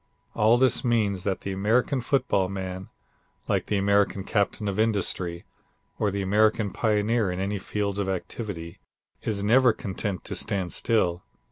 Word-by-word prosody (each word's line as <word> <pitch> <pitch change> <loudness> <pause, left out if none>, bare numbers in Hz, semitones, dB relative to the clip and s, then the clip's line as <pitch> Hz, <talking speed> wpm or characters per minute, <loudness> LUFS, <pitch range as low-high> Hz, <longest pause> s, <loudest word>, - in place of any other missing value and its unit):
All 110 +3 +4
this 130 0 +4
means 105 -6 +1
that 95 -2 -1
the 100 - -4
American 115 +7 +1
football 100 -7 +1
man, 95 -1 -5 0.6
like - - 0
the 105 - 0
American 100 0 +2
captain 105 +2 -1
of 100 +1 -2
industry, 95 -5 0 0.5
or 105 - +2
the 100 0 -2
American 105 +1 +2
pioneer 110 0 +1
in 90 0 -3
any 100 +1 -2
field 100 0 -2
of 100 -1 -1
activity, 95 -3 -5 0.4
is 100 -2 -2
never 120 +3 +5
content 95 -1 -4
to - - -4
stand 95 -3 -1
still. 90 -7 +1
100 Hz, 150 wpm, -26 LUFS, 95-110 Hz, 0.6 s, never